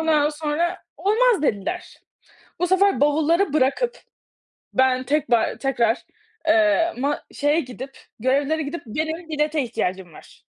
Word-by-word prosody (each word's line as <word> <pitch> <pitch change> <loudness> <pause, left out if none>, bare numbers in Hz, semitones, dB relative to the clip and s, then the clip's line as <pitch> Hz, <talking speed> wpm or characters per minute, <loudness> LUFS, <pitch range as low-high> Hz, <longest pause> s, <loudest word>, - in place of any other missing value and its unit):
Ondan 305 -2 +3
sonra, 315 +4 -1 0.2
olmaz 440 -3 +2
dediler, 280 - -2 0.6
bu 355 - +1
sefer 385 -2 +3
bavulları 315 +3 +2
bırakıp, 310 - +1 0.8
ben 260 0 +3
tekrar 270 -5 +1
tekrar, 240 -4 0 0.4
eee, 220 +8 +3
ma 285 +3 -2
şeye 295 +3 +1
gidip 260 +1 -9 0.2
görevlilere 280 +5 +1
gidip 290 +2 -5
benim 315 +8 -3
bilete 300 -1 0
ihtiyacım 190 -7 -3
var. - - -16
295 Hz, 120 wpm, -23 LUFS, 260-330 Hz, 0.8 s, Ondan